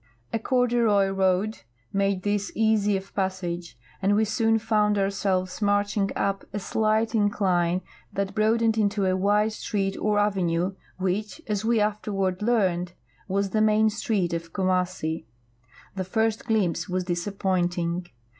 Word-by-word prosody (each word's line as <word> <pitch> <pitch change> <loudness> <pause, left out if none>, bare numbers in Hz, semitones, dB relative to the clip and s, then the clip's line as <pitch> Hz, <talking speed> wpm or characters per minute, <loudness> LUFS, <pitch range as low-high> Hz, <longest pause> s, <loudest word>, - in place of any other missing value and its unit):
A 225 - +1
corduroy 235 -5 +2
road 195 +2 +1 0.3
made 195 -1 +1
this 205 -1 -1
easy 215 -2 +2
of 190 +1 -10
i)assage, 180 -6 -3 0.3
and 200 +1 +3
we 220 +1 +3
soon 225 +1 +2
found 210 -2 +2
ourselves 195 -1 -1
marching 205 0 +1
up 195 0 -1
a 205 - -4
slight 215 +2 +1
incline 185 -5 +1 0.3
that 195 0 -2
broadened 225 +1 +2
into 205 -1 +1
a 185 0 +2
wide 205 +3 +2
street 195 -2 -2
or 210 0 +1
avenue 190 -3 +1 0.2
which, 190 - -2
as 210 -1 -2
we 230 0 +2
afterward 205 -3 -1
learned, 185 -6 +1 0.3
was 195 0 0
the 215 - +2
main 215 0 +4
street 205 -6 -1
of 165 0 -4
Kumassi. 180 - -1 0.7
'J'he 190 - -2
first 220 +2 0
glimpse 205 -6 0
was 185 0 -1
disappointing. 175 -1 -1
200 Hz, 135 wpm, -26 LUFS, 185-215 Hz, 0.7 s, main